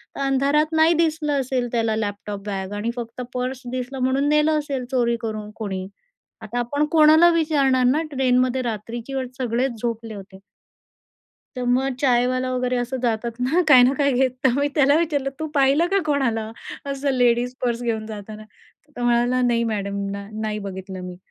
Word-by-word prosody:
तर - - -7
अंधारात 280 +3 +2
नाही 320 +2 +5
दिसलं 310 -3 +1
असेल, 255 -1 -1
त्याला 225 -2 0
लॅपटॉप 205 -1 -4
बॅग 195 0 -4
आणि 225 +3 -2
फक्त 235 +1 -6
पर्स 255 +1 -3
दिसलं 255 +1 -4
म्हणून 265 +3 +1
नेलं 300 +1 +3
असेल 275 -4 -4
चोरी 235 -2 +2
करून 215 -2 -4
कोणी." 190 -4 -4 0.6
आता 225 +2 -4
आपण 285 +5 0
कोणाला 315 +1 +7
विचारणार 280 -6 +2
ना, 270 +6 +3
ट्रेनमध्ये 255 -1 +2
रात्रीची 230 +3 -5
वेळ 260 -1 -2
सगळेच 240 -1 -1
झोपले 230 -2 -3
होते. 190 -1 -11 1.2
तर 250 - -3
मग 255 +2 +1
चायवाला 255 -1 +2
वगैरे 250 0 0
असं 245 +2 -2
जातात 235 0 -2
ना 315 +9 +2
काय 255 -4 +8
ना 255 +2 +4
काय 280 -1 +3
घेत, 255 +1 +2
तर 265 - +6
मी 285 0 +2
त्याला 285 0 +4
विचारलं, 290 -5 0
"तू 315 - -3
पाहिलं 280 +4 +3
का 395 - +3
कोणाला 235 -7 0 0.4
असं 275 +1 -1
लेडीज 245 -1 +2
पर्स 235 0 -1
घेऊन 220 -2 -2
जाताना?" 215 0 -8
तर 285 +6 -29
तो 245 - -5
म्हणाला, 240 +1 +2
"नाही 235 -1 +2
मॅडम, 200 -1 -3
ना 200 0 -6
नाही 215 -1 -2
बघितलं 190 0 -7
मी," 180 -1 -7
250 Hz, 175 wpm, -22 LUFS, 225-275 Hz, 1.2 s, काय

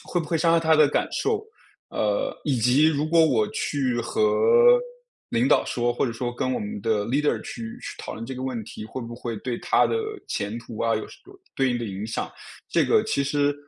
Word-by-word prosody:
会 175 - -2
不 165 - -3
会 165 - 0
伤 165 +2 +3
害 165 - +5
他 160 -1 +3
的 155 -2 +6
感 - - 0
受。 435 -1 0 0.5
呃， 105 -1 0
以 140 -4 0
及 125 +7 +4
如 150 -1 0
果 165 0 +5
我 120 -9 +2
去 130 -5 -1
和 445 - +1 0.9
领 115 +2 +1
导 140 - +4
说， 120 0 0
或 125 - 0
者 - - -2
说 120 +1 -4
跟 130 - -1
我 130 - 0
们 105 0 -5
的 105 0 0
leader 135 +1 +1
去 - - -8 0.2
去 - - -7
讨 - - -6
论 110 +2 -6
这 130 +2 -6
个 130 - -6
问 130 -3 -3
题， 105 - -9
会 120 - -7
不 115 0 -7
会 120 -2 -5
对 120 +3 -4
他 - - +3
的 - - -1 0.3
前 105 +3 -3
途 115 -1 -9
啊， 115 -1 +2
有 110 - -4
什 - - -14
有 390 0 -15 0.2
对 135 -1 +2
应 120 - -1
的 120 - -3
影 100 0 -5
响。 110 - -3 0.4
这 - - +3
个 - - +3
其 140 - 0
实 145 +1 +1
125 Hz, 270 characters per minute, -25 LUFS, 115-150 Hz, 0.9 s, 的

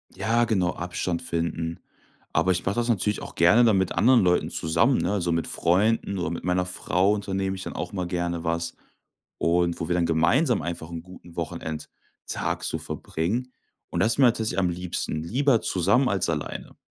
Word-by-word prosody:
Ja, 120 +1 +2
genau, 95 -6 +1
Abstand 90 0 -3
finden. 85 0 -2 0.5
Aber 95 - +3
ich 90 - -1
mache 95 - 0
das 120 0 0
natürlich 105 -2 +1
auch - - -9
gerne 90 +9 +6
dann 110 -4 +4
mit 95 -1 +1
anderen 125 -1 +5
Leuten 90 -1 +2
zusammen, 100 +11 +2
ne? 100 +1 0
So 85 - 0
mit 85 -1 0
Freunden 100 +3 +1
oder 90 - -2
mit 85 - -5
meiner 90 +1 +1
Frau 90 +2 +1
unternehme 95 -2 -2
ich 95 - -7
dann - - -6
auch - - -4
mal 90 -3 -2
gerne 85 -1 -2
was 85 0 -2 0.6
und 85 0 +1
wo 80 - -3
wir 90 - +1
dann 85 -1 +2
gemeinsam 115 - +3
einfach 85 -2 -5
'n 85 -1 -6
guten 90 -2 -14
Wochenendtag 80 -2 -5
so - - -1
verbringen. 115 +11 -3 0.4
Und - - -1
das 110 - +3
ist - - -4
mir 130 - +7
tatsächlich 110 -5 0
am 90 -2 +2
liebsten, 85 -3 -3
lieber 125 - +2
zusammen 100 +9 +2
als 95 -4 0
alleine. 75 -3 -4
90 Hz, 190 wpm, -25 LUFS, 85-105 Hz, 0.6 s, mir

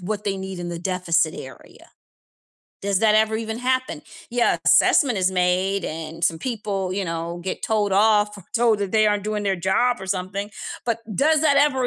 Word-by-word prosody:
what 205 +3 -4
they 195 -1 -1
need 190 -1 -6
in 175 0 -5
the 170 - -5
deficit 175 -3 0
area. 130 - -12 0.9
Does 200 -1 0
that 215 -1 +4
ever 220 0 +2
even 220 0 -4
happen, 255 -9 -1 0.3
yeah, 240 0 +2
assessment 250 -9 +4
is 185 0 +1
made 185 +1 +1
and 160 +1 -6
some 165 -1 +1
people, 200 -5 -3
you 195 0 -2
know, 165 +1 -4
get 190 - -4
told 210 -2 0
off 210 0 +3
or 190 - -14
told 230 -3 +3
that 200 -1 -3
they 215 -1 +4
aren't 205 -1 -1
doing 210 -1 -2
their 195 -2 0
job 190 +8 +1
or 190 - -7
something, 190 +2 -3 0.4
but 230 -1 0 0.2
does 310 +1 +3
that 290 -3 +3
ever 280 -3 +3
200 Hz, 190 wpm, -22 LUFS, 180-220 Hz, 0.9 s, that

